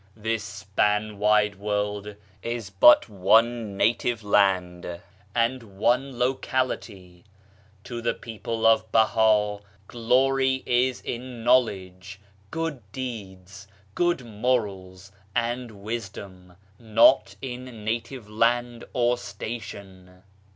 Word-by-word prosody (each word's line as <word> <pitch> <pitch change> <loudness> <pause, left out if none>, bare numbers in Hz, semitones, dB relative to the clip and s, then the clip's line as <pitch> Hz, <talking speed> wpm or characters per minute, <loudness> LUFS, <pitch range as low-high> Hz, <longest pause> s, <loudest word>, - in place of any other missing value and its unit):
This 110 0 -2
span 105 +1 -1
wide 105 -1 +3
world 105 0 -3 0.3
is 115 -4 -5
but 100 +5 +7
one 110 +1 +2
native 115 +1 +1
land 90 -4 +1 0.4
and 120 +2 +1 0.2
one 125 +4 +1
locality.... 125 -8 -2 0.6
To 120 0 -6
the 115 - 0
people 115 0 -5
of 110 -1 +4
Baha 110 -2 +3 0.3
glory 130 +3 +1
is 125 +1 +1
in 120 -1 -6
knowledge, 95 -6 +1 0.3
good 165 -3 -3
deeds, 100 -6 -8 0.3
good 175 -7 0
morals 100 -5 -2 0.2
and 120 +1 -1
wisdom 100 -4 -7
— 100 0 -32
not 115 -1 +4
in 125 -4 -8
native 115 +1 -3
land 120 +2 0
or 120 -1 +1
station." 100 -4 -8
110 Hz, 100 wpm, -25 LUFS, 100-120 Hz, 0.6 s, but